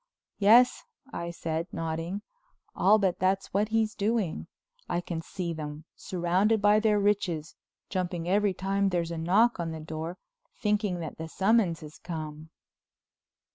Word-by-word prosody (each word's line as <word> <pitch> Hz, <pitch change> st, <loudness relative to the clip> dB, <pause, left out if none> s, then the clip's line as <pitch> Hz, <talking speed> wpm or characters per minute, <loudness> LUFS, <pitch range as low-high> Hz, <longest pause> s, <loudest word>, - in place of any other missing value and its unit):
"Yes," 230 Hz, +5 st, +6 dB, 0.3 s
I 170 Hz, 0 st, -4 dB
said, 165 Hz, 0 st, -3 dB
nodding. 165 Hz, +4 st, -3 dB, 0.5 s
"I'll 205 Hz, +4 st, +5 dB
bet 190 Hz, -4 st, 0 dB
that's 190 Hz, +1 st, 0 dB
what 205 Hz, +2 st, +1 dB
he's 220 Hz, -1 st, +1 dB
doing. 210 Hz, -5 st, -1 dB, 0.4 s
I 175 Hz, -, 0 dB
can 170 Hz, -2 st, -4 dB
see 175 Hz, 0 st, -4 dB
them, 150 Hz, -1 st, -6 dB
surrounded 185 Hz, +5 st, +1 dB
by 205 Hz, +1 st, +5 dB
their 215 Hz, -1 st, +3 dB
riches, 190 Hz, -6 st, 0 dB, 0.3 s
jumping 175 Hz, -3 st, -2 dB
every 200 Hz, +1 st, +2 dB
time 195 Hz, +1 st, +1 dB
there's 170 Hz, -2 st, -1 dB
a 170 Hz, -, -4 dB
knock 200 Hz, +7 st, +3 dB
on 170 Hz, -1 st, -2 dB
the 160 Hz, -, -6 dB
door, 160 Hz, +3 st, -5 dB, 0.4 s
thinking 205 Hz, -4 st, 0 dB
that 160 Hz, -, -7 dB
the 160 Hz, -, -4 dB
summons 190 Hz, -1 st, +2 dB
has 155 Hz, 0 st, -11 dB
come." 155 Hz, -2 st, -6 dB
180 Hz, 145 wpm, -28 LUFS, 165-205 Hz, 0.5 s, Yes